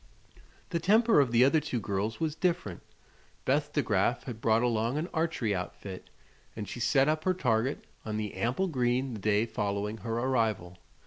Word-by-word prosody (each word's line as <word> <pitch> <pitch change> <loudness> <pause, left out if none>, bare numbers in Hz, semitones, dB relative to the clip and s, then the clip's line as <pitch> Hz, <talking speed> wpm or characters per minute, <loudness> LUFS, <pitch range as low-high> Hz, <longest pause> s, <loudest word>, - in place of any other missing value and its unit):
The 170 - 0
temper 220 +3 +4
of 135 -4 +3
the 120 +2 +6
other 140 +4 +4
two 135 -5 -3
girls 100 +3 -2
was 160 -2 0
different. 165 - -1 0.6
Beth 145 +2 +1
De 145 - +1
Graf 115 +3 +1
had 115 -4 -7
brought 110 +1 +3
along 115 +2 +1
an 160 +3 -2
archery 160 -10 0
outfit, 95 +1 -6 0.5
and 105 -2 -5
she - - -6
set 135 +3 +3
up 155 0 +1
her 185 +1 +1
target 125 -5 0 0.2
on 110 -1 -3
the 105 -2 -3
ample 130 +12 0
green 125 -3 0
the 110 - -6
day 105 +2 +2
following 105 -1 -2
her 115 +2 -3
arrival. 110 -8 0
120 Hz, 180 wpm, -29 LUFS, 110-150 Hz, 0.6 s, the